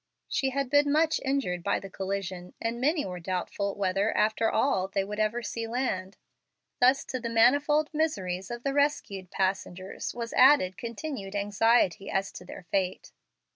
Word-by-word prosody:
She 270 - 0
had 275 -1 -2
been 290 0 +4
much 315 +2 +2
injured 265 -11 -1
by - - 0
the 195 - -8
collision, 190 -2 -5
and 230 +1 -3
many 300 +3 +2
were 180 -1 -5
doubtful 185 +3 -3
whether, 195 +2 +1
after 220 +1 +2
all, 190 -9 +1
they 195 0 -1
would 210 +2 -6
ever 215 +3 0
see 230 +1 -4
land. 200 -6 -2 0.6
Thus, 260 +2 +4
to 255 - -4
the 235 -1 -4
manifold 285 +7 +3
miseries 195 - -1
of 240 0 -6
the 275 - 0
rescued 275 -10 0
passengers, 190 0 -3
was 235 -1 -5
added 255 -9 +5
continued 230 - -6
anxiety 205 -1 +2
as 195 0 -1
to 180 - -10
their 180 - -10
fate. 190 -2 -1
215 Hz, 165 wpm, -28 LUFS, 190-265 Hz, 0.6 s, added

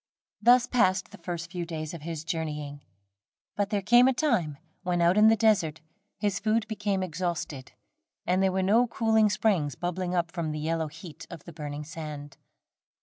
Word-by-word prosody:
Thus 245 +1 +6
passed 190 -6 +1
the - - -12
first 170 -1 -5
few 180 -2 -3
days 160 -2 -5
of 170 - -8
his 160 0 -5
journeying; 150 -4 -4 0.7
but 205 -1 0
there 205 -2 -1
came 240 +5 +6
a 265 - +3
time, 215 - 0 0.2
when, 180 -1 -1
out 170 +1 +4
in 210 +1 +6
the 225 - +6
desert, 200 -8 +2 0.4
his 200 -2 -1
food 220 +1 0
became 205 -3 -1
exhausted, 170 - -4 0.5
and 185 +1 +2
there 190 -1 +3
were 190 0 0
no 225 +6 +4
cooling 220 -2 +2
springs 175 - +1
bubbling 180 +1 -3
up 170 -1 0
from 170 -3 -3
the 155 - -4
yellow 160 +1 -1
heat 165 +1 -11
of 155 - -10
the 170 - -11
burning 150 -1 -6
sand. 150 -2 -8
175 Hz, 180 wpm, -27 LUFS, 160-210 Hz, 0.7 s, Thus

